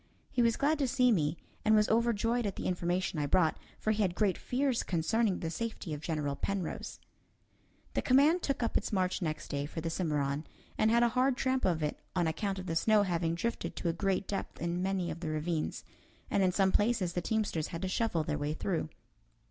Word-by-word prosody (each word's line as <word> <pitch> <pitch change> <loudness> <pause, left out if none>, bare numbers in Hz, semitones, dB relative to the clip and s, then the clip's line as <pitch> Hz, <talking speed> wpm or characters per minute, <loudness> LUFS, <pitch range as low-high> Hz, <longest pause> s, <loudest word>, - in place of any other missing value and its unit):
He 245 - +1
was 230 -1 +3
glad 300 +2 +2
to 275 - +2
see 250 -1 +3
me, 155 -5 +1 0.3
and 220 0 +5
was 210 0 +4
overjoyed 230 0 +2
at 195 - -3
the - - -5
information 175 -1 -1
I 145 - 0
brought, 160 +2 +2 0.2
for 215 - 0
he 215 0 0
had 180 -4 +1
great 200 -3 +2
fears 260 -1 0
concerning 195 +4 0
the 160 - -2
safety 220 -4 -4
of 150 - -5
General 150 -4 -2
Penrose. 195 +2 -3 0.9
The - - +1
command 290 +7 +4
took 275 -5 -1
up 230 - -1
its - - 0
march 185 -2 0
next 155 -3 -3
day 140 0 -2
for 160 - -6
the 165 0 -3
Cimarron, 150 -3 -1 0.3
and 215 - +3
had 235 +1 +4
a 240 - +4
hard 255 +2 +2
tramp 260 0 +1
of 165 -4 +1
it 150 - -2 0.2
on 175 -2 +2
account 195 +5 -1
of 185 - -6
the 165 - -2
snow 215 +4 +4
having 170 -3 0
drifted 230 +7 -3
to 170 - -1
a - - +1
great 195 +1 0
depth 200 - -4
in 170 +1 -1
many 185 -2 -1
of 160 - -6
the 165 -2 -3
ravines, 155 +1 -2 0.5
and 200 - +2
in 185 -1 +4
some 190 +1 +3
places 205 -5 +1
the 175 - -1
teamsters 205 -5 -1
had 165 +2 -6
to - - 0
shovel 185 -4 0
their 150 -1 -2
way 145 +1 -1
through. 165 -3 -2
185 Hz, 220 wpm, -32 LUFS, 165-225 Hz, 0.9 s, and